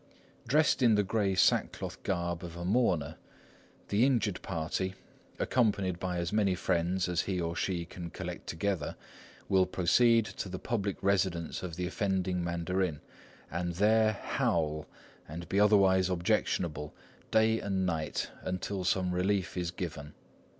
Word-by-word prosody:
Dressed 150 +2 +3
in 115 -4 +5
the 105 - +3
grey 100 -1 0
sackcloth - - +1
garb 85 -2 -2
of 85 -1 -7
a 85 - -5
mourner, 90 - +1 0.7
the 105 +3 +3
injured 115 -8 +1
party, 95 +1 -2 0.4
accompanied 100 -7 +1
by 90 -1 -2
as 85 +3 -2
many 100 -3 +2
friends 90 +1 0
as 90 -1 +1
he 95 -2 -2
or 85 -1 -2
she 85 0 -1
can 85 0 -8
collect - - -7
together, 90 -2 -2 0.5
will 95 -1 +3
proceed 115 +6 +4
to 100 - -6
the 95 - -4
public 100 -2 -2
residence 95 -4 0
of 90 -3 -5
the 90 - -2
offending 95 -2 -1
mandarin, 85 -1 -1 0.5
and 85 -1 -2
there 110 +3 +4
howl 75 -6 -1 0.4
and 85 +3 -7
be 100 - +1
otherwise 95 -3 +5
objectionable, 85 -3 -1 0.3
day 110 0 +3
and 95 -2 -1
night, 80 -4 -2
until 95 +1 -3
some 90 -1 +1
relief 95 +1 0
is 90 -2 -1
given. 80 -5 -6
95 Hz, 145 wpm, -31 LUFS, 85-100 Hz, 0.7 s, in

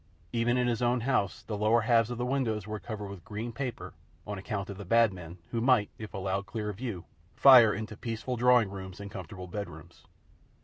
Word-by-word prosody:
Even 120 +1 +2
in 125 - +2
his 120 -2 0
own 120 0 +2
house 120 -6 0
the 110 - -4
lower 110 +3 +3
halves 115 0 +3
of 120 - -4
the 120 - -1
windows 120 -6 -1
were 110 0 -5
covered 105 -2 -6
with 100 -3 -9
green 110 +5 -5
paper 130 0 -5 0.3
on 105 -2 -5
account 100 +1 -4
of 100 - -8
the - - -5
Bad 115 -1 +4
Men 90 -1 -9
who 115 - -1
might, 125 -4 +3
if 110 -1 -7
allowed 95 +1 -2
clear 105 +1 -3
view, 105 -5 -5 0.3
fire 125 -5 +8
into 110 +1 -5
peaceful 115 +2 -4
drawing 120 -4 +4
rooms 95 -1 -8
and 100 0 -8
comfortable 95 0 -8
bedrooms. 100 +3 -8
110 Hz, 205 wpm, -29 LUFS, 100-120 Hz, 0.3 s, fire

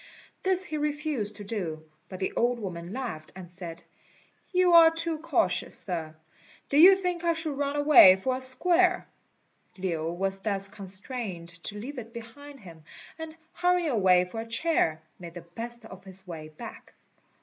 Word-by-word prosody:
This 375 0 +2
he 310 -3 -5
refused 295 -8 -2
to 205 - -9
do; 175 -7 -4 0.2
but 185 - -8
the 190 - -2
old 245 +1 +1
woman 180 -5 -6
laughed, 225 -11 -6
and 185 -2 -9
said, 175 -2 -7 0.7
"You 365 -1 +3
are 335 -1 +9
too 325 -1 -1
cautious, 275 - 0
Sir; 160 -4 -4 0.5
do 280 - +1
you 375 +4 +9
think 360 -2 -3
I 340 -1 +2
should 320 -3 -2
run 285 0 -2
away 290 -10 +8
for 255 +7 -2
a 260 - -5
square?" 355 +8 +2 0.7
Lin 170 -2 -3
was 195 +1 -1
thus 195 -1 -1
constrained 195 -2 -5 0.2
to 210 - -4
leave 255 +6 -6
it 230 0 -10
behind 275 +4 -11
him, 165 -5 -13 0.4
and 320 0 -7 0.2
hurrying 355 -2 +1
away 185 -5 +4
for 200 +5 -7
a 225 - -9
chair, 230 - 0 0.2
made 170 -1 -10
the 175 - -7
best 230 +7 -6
of 190 -3 -12
his 190 0 -5
way 155 -3 -8
back. 155 - -11
225 Hz, 170 wpm, -27 LUFS, 180-300 Hz, 0.7 s, are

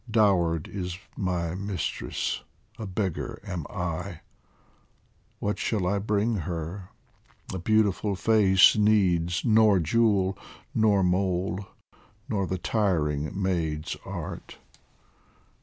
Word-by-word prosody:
Dowered 90 -8 +2
is 90 -3 -5 0.2
my 90 -3 -1
mistress, 100 0 -3 0.4
a 110 - -4
beggar 95 -2 -3
am 90 -6 -4
I; 90 0 -4 1.2
What 105 0 -2
shall 105 -5 0
I 100 +3 +1
bring 105 +2 0
her? 85 +2 -5 0.6
a 95 - -3
beautiful 105 0 +2
face 95 -2 +5
Needs 95 -5 +2
nor 110 -3 +5
jewel 95 +2 +2 0.3
nor 105 -3 +3
mole 95 +1 0 0.6
nor 100 -7 -1
the 95 - -2
tiring 85 -4 0
maid's 80 -5 -1
art. - - -7
95 Hz, 100 wpm, -27 LUFS, 90-105 Hz, 1.2 s, face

